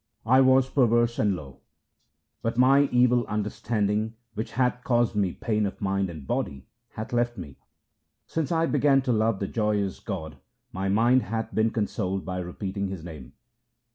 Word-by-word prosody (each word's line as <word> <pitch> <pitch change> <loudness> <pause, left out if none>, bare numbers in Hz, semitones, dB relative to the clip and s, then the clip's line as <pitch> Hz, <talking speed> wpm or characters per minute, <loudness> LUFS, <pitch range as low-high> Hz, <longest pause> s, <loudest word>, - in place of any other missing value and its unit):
I 130 +3 +5
was 130 0 +5
perverse 120 -3 +2
and 105 -3 +2
low, 70 -6 -10 0.8
but 115 0 -2
my 135 +3 +5
evil 125 0 +4
understanding 105 +1 -1 0.2
which 110 +2 -5
hath 125 0 0
caused 120 -2 +2
me 100 -3 +1
pain 105 -3 -1
of 100 - -8
mind 95 -1 0
and 80 -5 -9
body 65 0 -3 0.3
hath 110 +2 -6
left 120 0 0
me. 75 -7 -9 0.7
Since 160 0 -3
I 165 -1 +2
began 140 -3 +3
to 125 -2 +1
love 110 -1 +1
the 100 - -3
joyous 105 -3 -1
God, 80 -8 -6 0.3
my 95 +1 -2
mind 120 +6 +4
hath 115 -1 -4
been 110 +1 +2
consoled 100 -3 -2
by 90 -1 -3
repeating 95 +3 -4
His 95 -4 -6
name. 75 -7 -10
110 Hz, 165 wpm, -26 LUFS, 95-125 Hz, 0.8 s, I